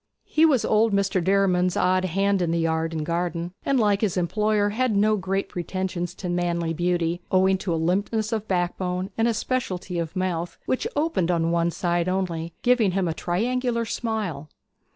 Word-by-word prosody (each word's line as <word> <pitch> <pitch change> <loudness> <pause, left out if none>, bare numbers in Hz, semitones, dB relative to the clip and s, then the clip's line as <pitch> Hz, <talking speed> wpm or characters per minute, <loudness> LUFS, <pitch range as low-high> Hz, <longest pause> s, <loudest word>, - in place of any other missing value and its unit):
He 320 +1 +4
was 270 -7 +2
old 220 0 +3
Mr. 195 -2 +1
Derriman's 185 -1 +2
odd 185 0 +2
hand 195 +2 +1
in 175 - 0
the 170 - +1
yard 160 0 0
and 155 -2 -3
garden, 170 +1 -2
and 275 -2 +2
like 205 -3 +2
his 200 -4 0
employer 210 +3 +1
had 230 +1 0
no 215 +2 +3
great 195 0 -2
pretensions 180 0 -4
to 185 - -6
manly 170 -1 -1
beauty, 175 0 0
owing 190 0 +4
to 185 - -3
a 165 - +1
limpness 200 +6 0
of 220 -1 -2
backbone 180 +1 -1
and 225 +1 +2
speciality 195 -8 -2
of 165 +1 -4
mouth, 175 -2 -2
which 260 - -1
opened 290 - 0
on 165 -1 +1
one 170 0 +2
side 175 0 0
only, 170 -3 -2
giving 240 -6 +3
him 190 -1 0
a 165 - -1
triangular 235 +8 -1
smile. 210 -12 -3
185 Hz, 175 wpm, -24 LUFS, 175-210 Hz, -, He